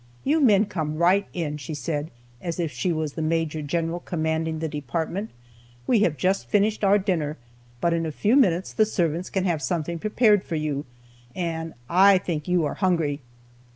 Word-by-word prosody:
'You 305 +4 +2
men 215 -6 +5
come 160 -6 -3
right 185 +4 +3
in,' 155 -4 -3
she 150 +2 -6
said, 150 +2 -3 0.3
as 170 0 -4
if 165 -3 -1
she 180 - -1
was 155 -3 -2
the 160 - -4
major 160 -1 -1
general 165 +3 -2
commanding 160 -1 -2
the 160 +1 -2
department. 160 - -3 0.6
'We 230 - +3
have 170 -8 +2
just 190 +6 0
finished 210 +1 +2
our 200 +1 +5
dinner, 170 -7 -1 0.4
but 170 +4 +1
in 165 -1 0
a - - -3
few 210 - +2
minutes 185 -10 +3
the 215 - +3
servants 175 -3 -1
can 190 -1 -1
have 170 -5 0
something 165 +4 -2
prepared 215 0 +3
for 165 - -4
you, 150 -3 -2 0.5
and 165 -2 -3
I 190 +3 +6
think 165 -5 -3
you 180 -3 +2
are - - -2
hungry.' 165 -7 0
170 Hz, 185 wpm, -25 LUFS, 155-190 Hz, 0.6 s, I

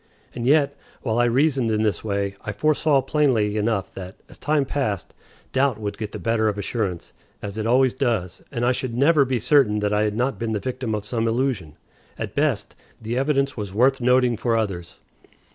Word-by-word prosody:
And 120 0 -3
yet, 140 0 +3 0.3
while 115 -2 0
I 120 - +4
reasoned 130 0 +2
in 110 0 +1
this 105 -2 0
way, 100 -2 -2
I 105 - -5
foresaw 150 +1 +2
plainly 120 -9 +1
enough 105 -2 -1
that, 95 +1 -8
as - - -15
time 150 -2 +1
passed, 120 - -2 0.4
doubt 130 -3 +1
would 105 -1 -4
get 105 -2 -4
the - - -6
better 115 -1 +1
of 105 -1 -1
assurance, 100 -4 -3 0.3
as 100 -1 -5
it 110 0 -2
always 130 +1 +4
does, 115 - -1
and 120 -3 -1
I 125 - +4
should 125 -2 -3
never 145 +1 +4
be 130 -1 0
certain 125 -2 +3
that 105 0 0
I 105 - +2
had 105 -1 0
not 125 +4 -1
been 115 -1 -2
the 105 - -1
victim 125 -2 -3
of 105 -1 -5
some 115 +1 -1
illusion. 115 - -1 0.4
At - - -5
best, - - 0 0.2
the 115 +2 -4
evidence 140 +1 +1
was 100 -3 -6
worth 130 +3 +3
nothing 125 -1 +3
for 115 0 +1
others. 90 -6 -4
115 Hz, 200 wpm, -23 LUFS, 105-130 Hz, 0.4 s, I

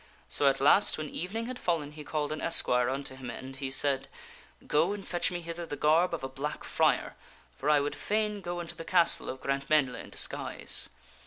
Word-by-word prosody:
So 145 - +2
at 135 0 +3
last, 150 +9 +5
when 155 -1 -5
evening 215 +7 -4
had 255 +1 -6
fallen, 160 -5 -1
he 150 0 -10
called 150 -1 -2
an 155 - -4
esquire 125 -7 +4
unto 135 0 -4
him 130 -2 -8
and 135 +1 -8
he 135 -1 -3
said, 135 0 +1 0.3
" - - -23
Go, 160 +6 +2
and 205 -1 -8
fetch 175 -1 0
me 175 -1 -4
hither 170 +1 -6
the 145 - -4
garb 160 +5 +3
of 160 - -9
a - - -1
black 135 +3 -5
friar, - - +1 0.4
for 145 - -2
I 150 -1 +5
would 145 +1 -2
fain 210 -1 -1
go 175 -1 -4
unto 170 -1 -5
the - - -8
castle 170 -1 +3
of 130 - -6
Grantmesnle 135 -1 +1
in - - -8
disguise." - - +1
150 Hz, 215 wpm, -29 LUFS, 135-175 Hz, 0.4 s, last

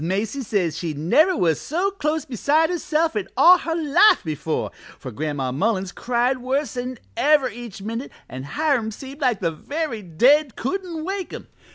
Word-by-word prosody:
Macy 205 +10 -2
says 180 - -1
she 165 -4 -3
never 305 - +3
was 165 -4 +1
so 360 +6 -1
close 310 -5 -2
beside 300 - +1
herself 325 -3 0
in 205 -3 -2
all 350 +7 +8
her 330 -1 -3
life 335 +6 +4
before, 155 0 -3 0.3
for 130 - -8
Gran'ma 140 0 -3
Mullins 190 - 0
cried 250 +2 0
worse 265 +3 -2
'n 250 0 -4 0.2
ever 290 -1 +4
each 225 -3 -9
minute 230 +5 -5 0.2
an' 130 - -7
Hiram 260 - 0
seemed 270 +6 -10
like 250 -6 +1
the 165 -3 0
very 285 - -4
dead 250 - +3
couldn't 335 +3 -4
wake 385 0 -3
him. - - -8
255 Hz, 170 wpm, -22 LUFS, 190-310 Hz, 0.3 s, all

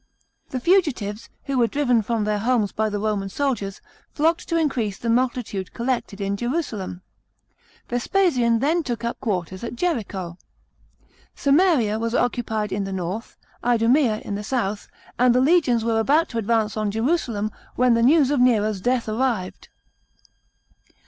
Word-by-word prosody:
The 255 - -3
fugitives, 250 - +1
who 275 -2 -1
were 235 - +4
driven 250 -4 +2
from 225 0 -1
their 210 0 0
homes 225 -2 +1
by 220 0 0
the 205 - -3
Roman 205 -2 -1
soldiers, 205 -5 -2 0.4
nocked 325 +3 +1
to 335 - +1
increase 240 -11 0
the 230 - -1
multitude 235 -6 -1
collected 235 -4 -2
in 200 0 -1
Jerusalem. 220 - -3 0.8
Vespasian 245 -3 +2
then 310 +8 +1
took 240 -6 -4
up 235 - -3
quarters 185 -4 -3
at 235 - -5
Jericho. 200 - -3 1.0
Samaria 280 - +3
was 230 +1 -2
occupied 220 -4 -1
in 200 0 -1
the 195 - -5
north, 190 +4 -5 0.3
Idumea 235 0 +3
in 205 - -4
the 205 +1 -4
south, 210 -3 -2 0.3
and 245 -1 +4
the - - +5
legions 265 -5 +3
weie 225 -1 +1
about 295 +8 +2
to 230 - -3
advance 220 -1 0
on 215 -1 -1
Jerusalem, 225 -2 -1 0.2
when 250 -1 +4
the 230 - +2
news 280 +2 +4
of 290 - +1
Nero's 215 -5 +2
death 245 +2 0
arrived. 220 -4 -2
235 Hz, 150 wpm, -23 LUFS, 210-260 Hz, 1.0 s, the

